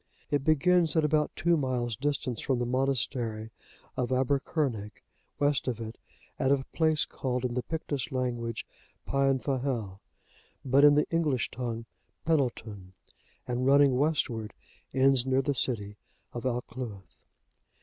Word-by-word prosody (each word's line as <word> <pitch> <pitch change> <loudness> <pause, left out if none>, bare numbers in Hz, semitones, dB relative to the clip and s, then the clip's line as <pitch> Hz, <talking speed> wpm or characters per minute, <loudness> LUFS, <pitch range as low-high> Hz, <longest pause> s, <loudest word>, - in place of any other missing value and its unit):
It 145 -2 +1
begins 160 +3 +3
at 160 -1 +3
about 150 0 +2
two 170 +1 +2
miles' 125 -5 -1
distance 135 -3 -2
from 130 - 0
the 120 - -1
monastery 120 -4 -1 0.4
of 125 - -1
Aebbercurnig,(77) 130 - 0 0.5
west 145 -2 +1
of 120 -3 -1
it, 110 0 -7 0.4
at 135 - +2
a 135 -1 +2
place 155 -2 +2
called 125 -1 -3
in 125 - -1
the 125 - 0
Pictish 145 -1 -3
language 120 -3 -2 0.4
Peanfahel,(78) 135 -6 0 0.7
but 135 +2 +4
in 145 0 +8
the 150 - +3
English 155 -7 +1
tongue, 115 -2 -4 0.4
Penneltun, 115 - -1 0.5
and 125 +1 -1
running 140 -1 +6
westward, 125 -7 0 0.4
ends 135 -1 +3
near 130 +1 +2
the 145 - +1
city 105 -6 -1 0.4
of 120 +2 -3
Alcluith. 120 -6 -5
130 Hz, 130 wpm, -29 LUFS, 120-145 Hz, 0.7 s, in